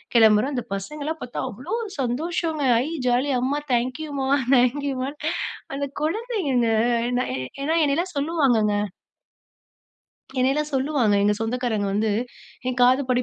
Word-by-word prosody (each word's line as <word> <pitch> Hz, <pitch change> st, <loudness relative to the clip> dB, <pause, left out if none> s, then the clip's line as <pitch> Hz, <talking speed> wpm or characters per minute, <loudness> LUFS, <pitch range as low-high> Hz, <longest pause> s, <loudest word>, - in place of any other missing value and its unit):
கிளம்புறோம். 220 Hz, +4 st, +5 dB
அந்த 245 Hz, -, -2 dB
பசங்களலாம் 300 Hz, +11 st, -4 dB
பார்த்தா 245 Hz, -, -4 dB
அவ்வளோ 255 Hz, -, -7 dB, 0.3 s
சந்தோஷங்க! 310 Hz, +4 st, -1 dB, 0.2 s
ஐ -, -, -4 dB, 0.2 s
ஜாலி 250 Hz, +3 st, +2 dB
அம்மா, 275 Hz, +3 st, 0 dB
தேங்க்யூம்மா, 265 Hz, +3 st, -1 dB, 0.3 s
தேங்க்யூமா! 260 Hz, +1 st, +1 dB, 0.7 s
அந்த 280 Hz, 0 st, -2 dB, 0.2 s
குழந்தைங்க, 325 Hz, -, 0 dB, 0.5 s
ஏன்னா 130 Hz, -, -3 dB
என்னையெல்லாம் 335 Hz, +5 st, -1 dB
சொல்லுவாங்கங்க. 270 Hz, -9 st, +2 dB, 1.6 s
என்னையெல்லாம் 280 Hz, +4 st, +1 dB
சொல்லுவாங்க, 265 Hz, -6 st, +2 dB
எங்க 210 Hz, 0 st, +3 dB
சொந்தக்காரங்க 225 Hz, -3 st, -1 dB
வந்து 215 Hz, +1 st, +1 dB, 0.6 s
என் 250 Hz, -1 st, -2 dB
காதுப்படி 255 Hz, 0 st, +3 dB
260 Hz, 105 wpm, -24 LUFS, 240-295 Hz, 1.6 s, கிளம்புறோம்